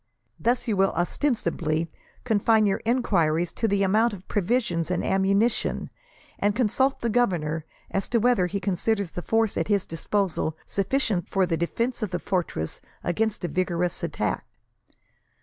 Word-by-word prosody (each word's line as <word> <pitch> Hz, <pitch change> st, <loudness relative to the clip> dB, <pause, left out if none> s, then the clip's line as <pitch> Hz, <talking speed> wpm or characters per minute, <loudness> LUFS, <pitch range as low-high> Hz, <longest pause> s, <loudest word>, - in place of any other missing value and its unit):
Thus 240 Hz, +2 st, +1 dB
you 220 Hz, -, +1 dB
will 195 Hz, 0 st, +3 dB
ostensibly 170 Hz, -, 0 dB, 0.3 s
confine 220 Hz, -1 st, +3 dB
your 195 Hz, -1 st, +1 dB
enquiries 175 Hz, -9 st, +2 dB
to 225 Hz, -, 0 dB
the 200 Hz, -1 st, +2 dB
amount 215 Hz, +4 st, +3 dB
of 190 Hz, -2 st, -10 dB
provisions 185 Hz, -, 0 dB
and 180 Hz, -, 0 dB
ammunition, 195 Hz, +4 st, +1 dB, 0.5 s
and 205 Hz, 0 st, +2 dB
consult 260 Hz, +3 st, +1 dB
the 235 Hz, -, 0 dB
governor 165 Hz, -10 st, +1 dB, 0.3 s
as 195 Hz, -, -1 dB
to 235 Hz, -, +2 dB
whether 225 Hz, -6 st, +3 dB
he 200 Hz, +2 st, -2 dB
considers 195 Hz, 0 st, 0 dB
the 175 Hz, -, -5 dB
force 225 Hz, +2 st, +1 dB
at -, -, -1 dB
his 200 Hz, -2 st, +2 dB
disposal 165 Hz, -2 st, -1 dB
sufficient 200 Hz, -3 st, 0 dB
for 195 Hz, -1 st, +2 dB
the 170 Hz, -2 st, 0 dB
defence 230 Hz, +10 st, -1 dB
of 215 Hz, -, -1 dB
the 180 Hz, -, -1 dB
fortress 175 Hz, -, -2 dB, 0.2 s
against 210 Hz, +2 st, 0 dB
a -, -, 0 dB
vigorous 175 Hz, 0 st, -1 dB
attack. -, -, -2 dB
195 Hz, 150 wpm, -26 LUFS, 175-225 Hz, 0.5 s, will